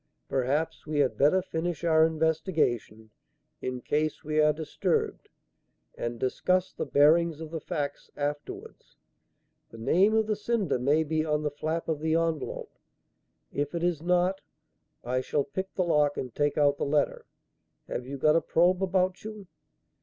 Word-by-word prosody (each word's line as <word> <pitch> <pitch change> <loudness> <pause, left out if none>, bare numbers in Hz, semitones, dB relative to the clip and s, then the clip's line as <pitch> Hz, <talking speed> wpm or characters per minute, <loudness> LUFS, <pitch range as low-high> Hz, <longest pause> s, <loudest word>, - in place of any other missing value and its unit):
"Perhaps 135 +5 -1
we 150 -1 -2
had 140 -3 +2
better 165 +7 +3
finish 170 -2 -3
our 160 -1 +5
investigation, 155 - -1 0.5
in 125 -1 -4
case 155 +4 -1
we 155 +1 0
are 150 0 +5
disturbed, 155 0 -2 0.7
and 120 0 -4
discuss 180 +9 0
the - - -4
bearings 160 +2 +4
of 160 -1 -7
the 165 - -3
facts 145 -3 -4
afterwards. 145 0 -5 0.7
The 115 - -12
name 185 - +3
of 220 0 +3
the 215 0 0
sender 205 - 0
may 145 +5 +3
be 155 0 0
on 150 -1 0
the 150 - -1
flap 160 +3 -3
of 160 -2 -1
the 160 +1 +1
envelope. 165 -3 -2 0.7
If 145 +3 -2
it 170 - -2
is 175 -4 0
not, 180 +2 +1 0.6
I 125 +1 0
shall 145 +2 0
pick 190 +7 -5
the 185 - +1
lock 150 -4 +2
and 125 -3 -4
take 145 0 0
out 145 -1 +3
the - - 0
letter. 145 0 0 0.6
Have 125 - -4
you 140 +1 -5
got 150 +3 +4
a 165 - +4
probe 180 +3 +2
about 185 -1 +1
you?" 215 -2 -8
155 Hz, 160 wpm, -28 LUFS, 145-175 Hz, 0.7 s, our